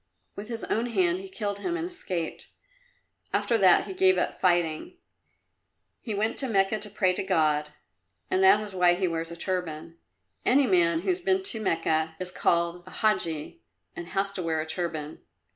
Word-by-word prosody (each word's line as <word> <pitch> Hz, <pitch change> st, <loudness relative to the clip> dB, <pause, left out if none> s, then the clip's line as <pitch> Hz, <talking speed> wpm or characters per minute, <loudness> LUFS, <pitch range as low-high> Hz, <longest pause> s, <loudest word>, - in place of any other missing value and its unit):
With 210 Hz, +3 st, -8 dB
his 230 Hz, -1 st, -4 dB
own 230 Hz, +2 st, -1 dB
hand 185 Hz, -6 st, +1 dB
he 190 Hz, 0 st, -9 dB
killed 200 Hz, +1 st, -4 dB
him 345 Hz, -, -2 dB
and 340 Hz, 0 st, -3 dB
escaped. 185 Hz, -, -4 dB, 0.8 s
After 235 Hz, -, +1 dB
that 185 Hz, -3 st, +5 dB
he -, -, -6 dB
gave 375 Hz, 0 st, +4 dB
up -, -, 0 dB
fighting. 175 Hz, -4 st, 0 dB, 1.0 s
He 220 Hz, -, -5 dB
went 215 Hz, +2 st, -1 dB
to 270 Hz, -, 0 dB
Mecca 195 Hz, 0 st, +2 dB
to 210 Hz, -, -4 dB
pray 190 Hz, -3 st, +1 dB
to -, -, -2 dB
God; 155 Hz, -5 st, +1 dB, 0.6 s
that 190 Hz, +2 st, +5 dB
is 210 Hz, -2 st, -7 dB
why 180 Hz, -1 st, +4 dB
he 185 Hz, +1 st, 0 dB
wears 165 Hz, -1 st, -3 dB
a 170 Hz, -, -8 dB
turban. 170 Hz, -3 st, -4 dB, 0.4 s
Any 270 Hz, +3 st, +4 dB
man 170 Hz, -5 st, +3 dB
who -, -, -3 dB
has 365 Hz, 0 st, +1 dB
been 380 Hz, +1 st, +1 dB
to 230 Hz, -, -1 dB
Mecca 160 Hz, -4 st, 0 dB
is 185 Hz, 0 st, -2 dB
called 170 Hz, -1 st, 0 dB
a -, -, -10 dB
Hadji 170 Hz, -8 st, -1 dB, 0.3 s
and 175 Hz, -, -7 dB
has 195 Hz, +1 st, -1 dB
to 200 Hz, -, -5 dB
wear 165 Hz, -2 st, -1 dB
a 155 Hz, -, -2 dB
turban. 160 Hz, -2 st, -3 dB
185 Hz, 180 wpm, -27 LUFS, 170-215 Hz, 1.0 s, that